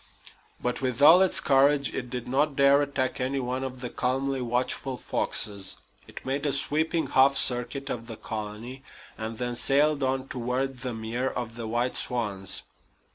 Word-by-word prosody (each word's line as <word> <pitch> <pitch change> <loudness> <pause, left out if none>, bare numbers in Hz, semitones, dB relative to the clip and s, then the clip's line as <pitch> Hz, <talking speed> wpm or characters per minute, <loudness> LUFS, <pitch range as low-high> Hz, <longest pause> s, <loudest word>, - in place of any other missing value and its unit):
But, 125 +1 -3
with 130 -2 -2
all 160 +6 +8
its 190 - +4
courage, 140 -1 +3
it 125 -1 -4
did 125 -1 -5
not 140 +3 +1
dare 140 +1 +5
attack 140 -2 -2
any 135 +2 -1
one 130 +1 -3
of 130 -1 -6
the 125 - -4
calmly 135 +1 -1
watchful 125 +2 -2
foxes. 100 -5 0 0.3
It - - -11
made 140 +3 -1
a 140 - 0
sweeping 155 +4 0
half 135 +1 +4
circuit 130 +2 +3
of 115 -4 -5
the 115 -2 -8
colony, 110 +4 -7 0.3
and 110 0 -6
then 120 0 -3
sailed 145 +4 +3
on 130 0 -1
toward 125 +1 -3
the 125 -2 -5
mere 115 +4 -3
of 120 -3 -5
the 115 -1 -6
white 120 +3 -1
swans. 105 -6 -3
130 Hz, 170 wpm, -26 LUFS, 120-140 Hz, 0.3 s, all